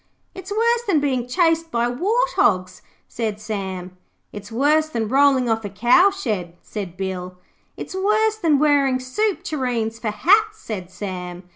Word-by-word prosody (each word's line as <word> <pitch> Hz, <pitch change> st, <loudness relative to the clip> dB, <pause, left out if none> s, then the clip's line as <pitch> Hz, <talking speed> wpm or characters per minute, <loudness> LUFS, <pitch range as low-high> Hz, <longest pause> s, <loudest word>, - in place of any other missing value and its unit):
'It's 380 Hz, 0 st, -9 dB
worse 465 Hz, +3 st, +2 dB
than 345 Hz, -7 st, +3 dB
being 260 Hz, -4 st, -1 dB
chased 330 Hz, +3 st, +1 dB
by 235 Hz, -3 st, 0 dB
wart 420 Hz, -, 0 dB
hogs,' 185 Hz, -1 st, +1 dB, 0.3 s
said 215 Hz, -3 st, -4 dB
Sam. 190 Hz, -4 st, -5 dB, 0.4 s
'It's 205 Hz, 0 st, -9 dB
worse 300 Hz, +6 st, +2 dB
than 230 Hz, -6 st, -2 dB
rolling 270 Hz, 0 st, +3 dB
off 225 Hz, -1 st, 0 dB
a 205 Hz, -, -4 dB
cowshed,' 235 Hz, -, +2 dB
said 190 Hz, -5 st, -7 dB
Bill. 185 Hz, -1 st, -5 dB, 0.4 s
'It's -, -, -7 dB
worse 430 Hz, +3 st, +1 dB
than 325 Hz, -8 st, +2 dB
wearing 280 Hz, -3 st, +3 dB
soup 345 Hz, +8 st, -1 dB
tureens 245 Hz, -8 st, -2 dB
for 225 Hz, -, -2 dB
hats,' 420 Hz, -, +3 dB
said 205 Hz, -, -6 dB
Sam. 180 Hz, -2 st, -6 dB
250 Hz, 150 wpm, -21 LUFS, 205-345 Hz, 0.4 s, than